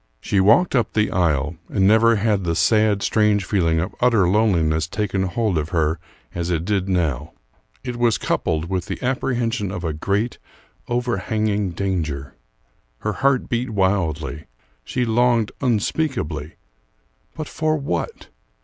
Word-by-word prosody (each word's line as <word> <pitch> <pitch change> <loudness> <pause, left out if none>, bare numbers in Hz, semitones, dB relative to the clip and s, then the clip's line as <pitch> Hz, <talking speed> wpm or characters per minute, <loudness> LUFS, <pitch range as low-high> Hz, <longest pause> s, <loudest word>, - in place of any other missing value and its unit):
She 100 - 0
walked 115 - +4
up 120 - +1
the 105 0 +1
aisle, 80 -3 0
and 95 -2 +1
never 115 +2 +5
had 105 -2 +1
the 85 -1 -1
sad, 105 +3 +3
strange 105 -3 +2
feeling 85 -5 +1
of 85 - -3
utter 115 -7 +4
loneliness 85 -7 +2
taken 100 0 -2
hold 100 -2 0
of 75 +1 -4
her 80 -2 0 0.3
as 85 0 -3
it 85 -1 -1
did 100 -1 0
now; 80 -5 -1 0.5
it 125 -2 -4
was 120 -2 +2
coupled 80 0 -1
with 90 0 -3
the - - -4
apprehension 120 -5 -1
of 95 -3 -5
a 80 -2 -1
great, 100 +9 -1 0.5
overhanging 110 -4 -1
danger. 80 -8 -3 0.7
Her 105 - -1
heart 135 +5 +1
beat 120 +2 -1
wildly; 90 -7 -1 0.4
she 125 - -1
longed 115 -1 +2
unspeakably 115 - -1 0.8
but 155 -2 -5
for 155 -1 0
what? 90 - -4
100 Hz, 140 wpm, -21 LUFS, 85-115 Hz, 0.8 s, never